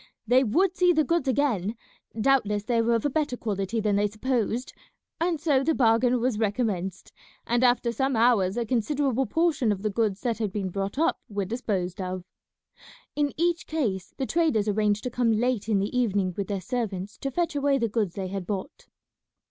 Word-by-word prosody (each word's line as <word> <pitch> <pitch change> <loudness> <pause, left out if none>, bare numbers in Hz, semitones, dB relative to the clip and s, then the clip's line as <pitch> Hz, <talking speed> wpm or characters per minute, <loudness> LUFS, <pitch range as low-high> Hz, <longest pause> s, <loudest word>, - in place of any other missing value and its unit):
They 250 +3 +4
would 350 - +2
see 360 -1 +4
the 310 -1 +3
goods 335 -3 0
again; 240 -7 +1 0.4
doubtless 210 -5 +2
they 230 +1 +1
were 230 +1 +2
of 230 - -1
a - - +3
better 295 -4 -1
quality 205 0 -2
than 210 -2 +1
they 205 +1 +2
supposed; 235 +2 -2 0.5
and 335 -1 0
so 285 -4 +2
the 320 +2 +1
bargain 240 +1 +3
was 235 -2 0
recommenced, 200 -4 -2 0.3
and 240 +1 +1
after 245 -1 +3
some 265 +3 0
hours 220 -4 +3
a 235 - 0
considerable 260 +2 0
portion 320 -9 +1
of 200 -1 -3
the 215 - 0
goods 210 -2 0
that 235 -3 -1
had 215 -3 -1
been 195 -2 -2
brought 195 +5 -3
up 330 +3 +1
were 200 -2 -2
disposed 190 -4 -3
of. 185 0 -4 0.9
In 290 -1 +1
each 340 +1 0
case 210 - -2
the 265 - -1
traders 305 -10 +1
arranged 210 0 +1
to 250 - -3
come 235 -1 +2
late 230 -1 0
in 210 - +3
the 200 +5 -2
evening 200 -7 +1
with 200 -2 -3
their 200 -2 -3
servants 210 -5 -4
to 275 - -2
fetch 335 +3 -1
away 280 -1 +2
the 235 -3 0
goods 210 -5 -1
they 190 -2 -4
had 190 -2 -5
bought. 195 -2 -5
230 Hz, 195 wpm, -26 LUFS, 205-270 Hz, 0.9 s, They